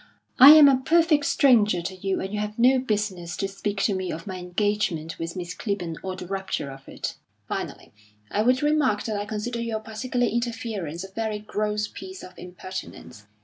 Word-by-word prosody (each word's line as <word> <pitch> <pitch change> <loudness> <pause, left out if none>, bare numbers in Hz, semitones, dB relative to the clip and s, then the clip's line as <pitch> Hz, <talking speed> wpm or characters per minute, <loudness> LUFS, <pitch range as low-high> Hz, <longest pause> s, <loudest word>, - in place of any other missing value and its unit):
I 275 +4 +12
am 305 -2 +9
a 270 -2 +5
perfect 320 -2 +3
stranger 215 - +4
to 185 +2 -4
you, 190 +1 -2
and 190 +2 -5
you 210 - -1
have 210 0 -4
no 255 +2 +5
business 205 -8 -2
to 195 - -1
speak 195 0 -3
to 205 - +2
me 185 -1 -3
of 165 +1 -6
my 190 -2 -5
engagement 180 -3 -1
with 165 +1 -4
Miss 175 -1 -5
Clibborn 185 -6 -3
or 190 -1 -4
the 185 - -8
rupture 190 -6 -3
of 135 0 -13
it. - - -5 0.3
Finally, - - -5 0.4
I 210 - +1
would 255 +4 +2
remark 295 -8 +2
that 220 - -3
I 205 0 -2
consider 225 +2 -3
your 230 -2 -2
particular 245 +3 -2
interference 225 -8 -3
a 195 - -10
very 220 0 -2
gross 210 0 -2
piece 375 +8 -10
of 185 - -11
impertinence. 180 - -9
210 Hz, 190 wpm, -25 LUFS, 185-235 Hz, 0.4 s, I